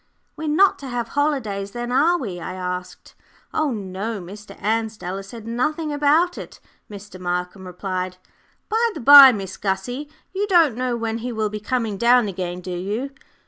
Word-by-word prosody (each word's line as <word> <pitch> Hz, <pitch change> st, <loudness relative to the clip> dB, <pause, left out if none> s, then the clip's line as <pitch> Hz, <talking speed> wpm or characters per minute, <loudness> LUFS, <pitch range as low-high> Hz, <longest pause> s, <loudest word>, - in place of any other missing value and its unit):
"We're 315 Hz, -, -5 dB
not 375 Hz, +7 st, +4 dB
to 275 Hz, -, -8 dB
have 240 Hz, -2 st, -3 dB
holidays, 225 Hz, -10 st, -1 dB
then, 240 Hz, 0 st, -4 dB
are 315 Hz, +7 st, +3 dB
we?" 195 Hz, -, -5 dB
I 185 Hz, +2 st, -6 dB
asked. 180 Hz, 0 st, -6 dB, 0.4 s
"Oh, 310 Hz, -1 st, +1 dB
no; 205 Hz, -1 st, -4 dB
Mr. 200 Hz, +3 st, -11 dB
Ansdell 215 Hz, -3 st, -2 dB
has 195 Hz, 0 st, -8 dB
said 225 Hz, +1 st, -10 dB
nothing 300 Hz, +7 st, -2 dB
about 305 Hz, +5 st, +2 dB
it," -, -, -10 dB, 0.3 s
Mr. 205 Hz, -2 st, -10 dB
Markham 180 Hz, +1 st, -3 dB
replied. 185 Hz, 0 st, -4 dB, 0.5 s
"By 460 Hz, +2 st, +1 dB
the -, -, -5 dB
by, 275 Hz, +1 st, +10 dB
Miss 195 Hz, -5 st, -5 dB
Gussie, 210 Hz, +9 st, -3 dB, 0.2 s
you 400 Hz, +2 st, -1 dB
don't 335 Hz, -, +4 dB
know 250 Hz, -1 st, -1 dB
when 225 Hz, 0 st, -3 dB
he 245 Hz, +2 st, -4 dB
will 220 Hz, -2 st, -1 dB
be 210 Hz, +1 st, -5 dB
coming 220 Hz, -1 st, -2 dB
down 240 Hz, +1 st, +4 dB
again, 180 Hz, -2 st, -4 dB
do 180 Hz, -, -7 dB
you?" 205 Hz, +10 st, -3 dB
225 Hz, 175 wpm, -22 LUFS, 190-275 Hz, 0.5 s, by